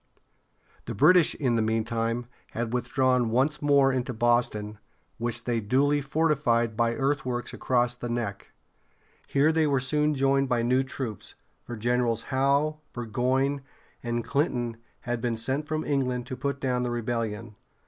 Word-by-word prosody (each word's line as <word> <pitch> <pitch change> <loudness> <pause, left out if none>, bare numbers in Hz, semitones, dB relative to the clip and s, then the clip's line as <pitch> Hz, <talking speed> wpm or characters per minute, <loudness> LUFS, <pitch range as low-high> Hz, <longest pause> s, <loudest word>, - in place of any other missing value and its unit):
The - - -5
British, 170 +3 +5
in 125 -5 0
the - - +2
meantime, 115 +2 -1 0.3
had 120 0 -3
withdrawn 125 0 +1
once 135 +6 +1
more 140 -2 +4
into 125 -1 -2
Boston, 110 -3 +1 0.4
which 120 0 -2
they 120 -1 0
duly 140 +7 +2
fortified 140 -6 +1
by 115 0 +1
earthworks 135 -3 -1
across 120 -1 +1
the 120 0 -6
Neck. 115 -4 -4 0.8
Here 145 +3 +3
they 160 -1 +2
were 140 -2 +2
soon 150 +3 +1
joined 135 0 +2
by 120 -2 +1
new 125 +2 +3
troops; 130 -5 -6 0.3
for 120 - -8
Generals 120 0 0
Howe, 140 +3 +2
Bur 120 -1 -5
goyne´, 130 +4 0 0.4
and 120 0 -2
Clinton 120 -6 -1 0.2
had 120 -1 -3
been 120 -2 -1
sent 135 +6 -2
from 155 0 -2
England 125 -4 -1
to 130 0 -5
put 140 +2 -3
down 125 -2 0
the 125 - -1
rebellion. 115 -2 -3
125 Hz, 150 wpm, -27 LUFS, 115-140 Hz, 0.8 s, British